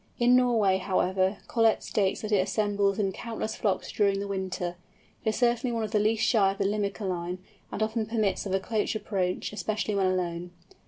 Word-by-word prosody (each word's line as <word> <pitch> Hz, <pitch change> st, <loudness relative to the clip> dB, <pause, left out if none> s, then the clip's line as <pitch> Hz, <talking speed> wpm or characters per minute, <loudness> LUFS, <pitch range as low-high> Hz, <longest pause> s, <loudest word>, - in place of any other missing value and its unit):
In 245 Hz, +1 st, +5 dB
Norway, 225 Hz, -7 st, +3 dB
however, 190 Hz, +1 st, +1 dB
Collett 225 Hz, -2 st, +2 dB
states 195 Hz, -2 st, 0 dB
that 215 Hz, -, -4 dB
it 205 Hz, -, +4 dB
assembles 200 Hz, 0 st, +1 dB
in 200 Hz, -3 st, +1 dB
countless 220 Hz, +1 st, -4 dB
flocks 200 Hz, -4 st, -1 dB
during 200 Hz, -2 st, +2 dB
the 200 Hz, -, -3 dB
winter. 185 Hz, -2 st, -3 dB, 0.5 s
It -, -, +1 dB
is 215 Hz, -, -1 dB
certainly 240 Hz, 0 st, +1 dB
one 230 Hz, -1 st, -1 dB
of 215 Hz, -, -4 dB
the 215 Hz, -, +2 dB
least 215 Hz, +1 st, +2 dB
shy 200 Hz, -5 st, +4 dB
of 195 Hz, -, -8 dB
the 200 Hz, -, 0 dB
Limicolæ, 195 Hz, -3 st, -2 dB, 0.3 s
and 220 Hz, -, -1 dB
often 220 Hz, 0 st, -1 dB
permits 215 Hz, -3 st, 0 dB
of 190 Hz, -, -3 dB
a -, -, +2 dB
close 215 Hz, +2 st, -1 dB
approach, 190 Hz, -3 st, -2 dB
especially 215 Hz, +1 st, -2 dB
when 195 Hz, -2 st, +2 dB
alone. 175 Hz, -1 st, -2 dB
205 Hz, 195 wpm, -28 LUFS, 190-220 Hz, 0.5 s, In